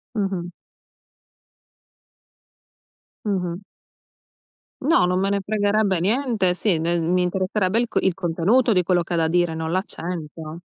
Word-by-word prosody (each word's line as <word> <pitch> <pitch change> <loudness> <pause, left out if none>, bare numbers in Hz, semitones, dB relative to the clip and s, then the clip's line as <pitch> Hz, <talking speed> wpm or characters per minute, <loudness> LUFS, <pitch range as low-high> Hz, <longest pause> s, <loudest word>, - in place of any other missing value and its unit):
Mh-mh. 190 -4 -2 2.8
Mh-mh. 180 -4 -1 1.2
No, 275 - +4
non 180 +1 +1
me 195 +1 +1
ne 200 -1 0
fregherebbe 205 -3 +1
niente. 215 -2 +1
Sì, 180 -2 +1
ne 170 +2 0
mi 180 +2 +1
interesserebbe 190 +3 0
il 240 - -1
co - - +1
il 190 - +1
contenuto 195 +9 +2
di 180 -3 +4
quello 175 -1 +2
che 175 - -5
ha - - +1
da 160 -1 +2
dire, 175 0 +1
non 160 0 -3
l'accento. 165 -3 -5
180 Hz, 135 wpm, -22 LUFS, 170-205 Hz, 2.8 s, No